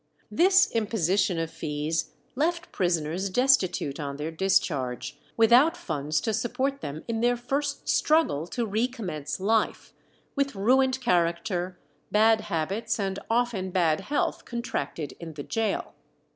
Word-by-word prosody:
This 375 +2 +4
imposition 205 -4 +1
of 165 0 -2
fees 155 +1 -3 0.2
left 340 +5 -1
prisoners 175 +1 0
destitute 190 - +2
on 140 -2 -4
their 150 +2 -4
discharge, 145 -7 0 0.2
without 245 +9 +5
funds 155 - -2
to 220 - -1
support 270 +5 -1
them 145 +2 -6
in 225 -1 -2
their 245 +1 +2
first 275 +4 -3
struggle 300 - +2
to 240 +5 -2
recommence 205 - -3
life, 220 +3 0 0.4
with 275 -3 0
ruined 260 +6 +3
character, 175 -2 0 0.3
bad 220 +1 +4
habits, 210 +7 -2
and 195 -1 -2
often 225 -5 0
bad 170 -4 +2
health 295 - -1
contracted 235 - -4
in 165 -2 -8
the 145 - -6
gaol. 220 +3 -2
205 Hz, 130 wpm, -27 LUFS, 165-245 Hz, 0.4 s, without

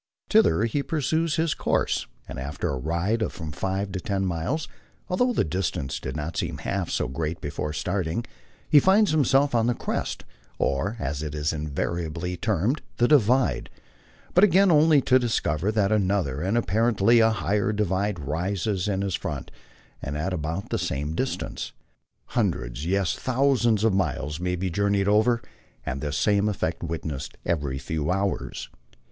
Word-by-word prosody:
Thither 85 +5 +5
he 115 +5 0
pursues 160 +2 0
his 160 -1 +1
course, - - 0 0.2
and - - -6
after 70 +2 -3
a 70 - -1
ride 85 - 0
of 110 - 0
from 80 -3 -6
five 95 +7 -2
to 95 - -3
ten 95 +1 -1
miles, 90 - -2 0.4
although 245 +8 +2
the - - +2
distance 80 -4 -2
did 65 - -5
not 80 +2 -4
seem - - -2
half 100 -3 -2
so - - 0
great 80 +5 -3
before 75 +1 -3
starting, 90 +5 -2 0.5
be 150 - +9
finds 195 +5 +4
himself 140 -2 +3
on 115 -1 +3
the 120 - +1
crest, - - -3 0.3
or, 90 +12 0
as 70 +1 -2
it 75 -1 -4
is 75 +1 0
invariably 85 +3 -3
termed, 110 - 0 0.2
the 120 - +4
"divide," 130 -2 +3 0.6
but 180 - +5
again 195 -1 +6
only 155 -1 +5
to 130 0 +4
discover 105 -7 0
that 105 -2 +1
another 95 -9 +1
and 95 +6 +1
apparently 115 +2 +3
a 110 0 +5
higher 105 -1 0
divide 100 -1 0
rises 90 +6 -2
in 100 -1 0
his 100 -2 -2
front, - - -4 0.5
and 70 +2 -4
at 90 +5 -2
about 85 +3 -3
the - - 0
same 75 +3 -2
distance. 130 +10 -3 0.6
Hundreds, 80 - -1
yes, 95 -1 +1
thousands 125 -4 +2
of 110 -3 +3
miles 80 -5 -1
may 90 0 -1
be 90 0 -2
journeyed 100 +2 +1
over, 110 +3 +3 0.4
and 65 +2 -3
this 75 -2 -2
same 105 0 +2
effect 85 -4 -2
witnessed 80 -4 -5
every 70 -5 -1
few 75 +1 -3
hours. 95 +1 -1
95 Hz, 165 wpm, -25 LUFS, 80-115 Hz, 0.6 s, be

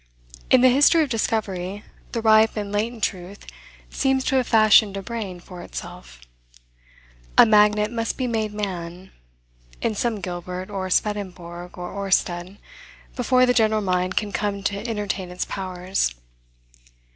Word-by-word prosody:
In 255 - +6
the 255 - +7
history 290 +5 +5
of 295 - -4
discovery, 205 -3 -2 0.3
the 230 -2 -3
ripe 220 0 +5
and 205 -1 -3
latent 220 +2 -2
truth 185 +2 -4 0.5
seems 265 -1 +1
to 270 - 0
have 255 - +1
fashioned 215 -2 +5
a 195 - -5
brain 205 -5 -5
for 175 0 -11
itself. - - -9 1.2
A - - +9
magnet 210 0 +4
must 230 -1 -3
be 255 - -1
made 220 -3 -1
man, 185 -3 -6 0.7
in 230 - -1
some 220 0 -1
Gilbert, 180 +1 -6
or 190 -2 -3
Swedenborg, 180 -4 -3
or 175 0 -6
Oersted, 185 -1 -1 0.6
before 255 0 +3
the 250 - +3
general 220 -2 +2
mind 185 0 -1
can 210 -1 0
come 200 -1 -2
to 200 +4 -2
entertain 200 -4 -3
its 180 0 -4
powers. 185 - -2
205 Hz, 145 wpm, -23 LUFS, 185-225 Hz, 1.2 s, A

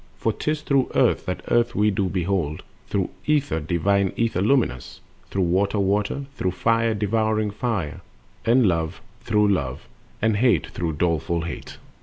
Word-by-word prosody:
For 110 - 0
'tis 150 +5 -2
through 135 -2 +2
Earth - - +2
that 90 - -3
Earth 120 0 +2
we 105 +1 +3
do 95 -1 0
behold, 85 -5 -1 0.2
Through 95 -2 -1 0.2
Ether, 145 - +1
divine 95 +5 +1
Ether 115 -6 0
luminous, 105 - 0 0.3
Through 95 - 0
Water, 95 +4 +1
Water, 100 +7 0
through 95 -9 -2
Fire, 115 +2 +1
devouring 110 0 0
Fire, 105 - -3 0.4
And 120 +1 +4
Love 80 -3 -1 0.2
through 105 -1 +2
Love, 70 -7 -1 0.3
and 110 -1 +2
Hate 120 +2 +3
through 85 -2 -3
doleful 85 +1 0
Hate. 85 - -7
100 Hz, 150 wpm, -23 LUFS, 85-115 Hz, 0.4 s, And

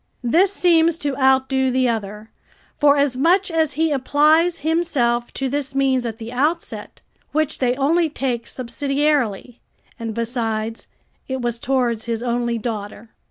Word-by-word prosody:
This 345 +11 +3
seems 335 -4 +3
to 285 -5 -2
outdo 265 0 +2
the 255 0 +1
other, 215 -1 -4 0.4
forasmuch 290 +6 +3
as 320 -3 +1
he 320 +2 0
applies 305 +5 +2
himself 280 -7 0
to 270 - -1
this 275 0 -3
means 265 -3 +1
at 225 -1 -6
the 225 0 -8
outset, 305 +7 -2 0.3
which 310 0 0
they 250 -1 +1
only 320 +5 +2
take 250 -5 -3
subsidiarily; 260 -2 -1 0.4
and, 225 -2 -5
besides, 225 -1 -3 0.4
it 260 -1 -4
was 240 -1 -2
towards 240 -4 0
his 230 0 -3
only 240 -1 -1
daughter. 215 0 -6
265 Hz, 135 wpm, -21 LUFS, 235-300 Hz, 0.4 s, This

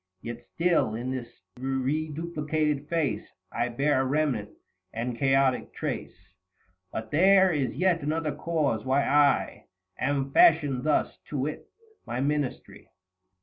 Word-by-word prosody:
120 - - -5 0.4
Yet 180 - +5
still, 130 -9 +2
in 125 +3 -3
this 130 -2 -4 0.3
reduplicated 150 +2 -2
face, 165 -5 0 0.3
I 120 - -1
bear 135 +3 +1
a - - +1
remnant 135 -6 0 0.4
and 120 +2 -3
chaotic 135 0 +1
trace. 90 +1 -6 0.6
But 110 0 -6
there 190 +3 +5
is 135 -6 -1
yet 180 -2 +2
another 155 +1 -1
cause 155 -10 -1
why 135 +2 +2
I 145 0 +2 0.3
Am 135 +1 0
fashioned 145 -4 +4
thus, 155 - +1
to 145 - -4
wit, 145 +3 -3 0.4
my 120 - -3
Ministry. 145 -1 -3
140 Hz, 130 wpm, -27 LUFS, 130-155 Hz, 0.6 s, Yet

